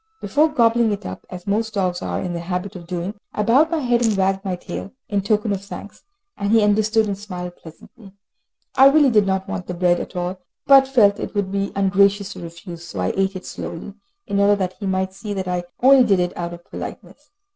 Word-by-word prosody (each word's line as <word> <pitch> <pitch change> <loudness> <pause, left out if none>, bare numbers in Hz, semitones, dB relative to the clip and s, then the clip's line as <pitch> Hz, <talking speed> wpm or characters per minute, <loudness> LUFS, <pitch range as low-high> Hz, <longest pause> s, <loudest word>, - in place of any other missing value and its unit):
Before 305 +2 +2
gobbling 235 -5 +3
it 205 - -4
up, 95 - -7
as 180 -1 -9
most 220 +2 -1
dogs 180 -3 0
are - - -3
in 180 -2 -3
the 170 - -3
habit 180 +3 -4
of 170 -2 -9
doing, 180 +2 -3 0.2
I 210 - 0
bowed 265 +9 +4
my 330 - 0
head 240 -2 +2
and 220 -3 +2
wagged 195 0 +1
my 190 -3 -2
tail, 190 +2 -7 0.2
in 205 -2 0
token 210 +1 0
of 195 0 -4
thanks, 205 +1 -10 0.3
and 200 0 -2
he 225 -1 +5
understood, 215 +2 +3
and 200 -1 -2
smiled 180 -3 -7
pleasantly. 195 +6 -15 0.6
I 270 - +8
really 285 -2 +4
did 210 -3 +4
not 190 0 -1
want 180 - -5
the 180 - -4
bread 175 0 +2
at - - -7
all, 180 +1 -3 0.3
but 270 -1 +7
felt 210 -7 +4
it - - -6
would 200 -2 -1
be 200 0 -1
ungracious 200 +1 +2
to - - -10
refuse, 170 0 -9
so 100 - -7
I 90 0 0
ate 195 0 0
it 185 - -7
slowly, 180 +4 -7 0.3
in 200 - -1
order 200 +1 +5
that 185 -2 -2
he 200 - -4
might 190 0 -1
see 205 +1 -6
that 190 -1 -3
I 180 -1 -2 0.2
only 265 0 +7
did 200 -6 +3
it 180 0 -1
out 175 0 -4
of 175 - -17
politeness. - - -9
200 Hz, 230 wpm, -21 LUFS, 180-215 Hz, 0.6 s, I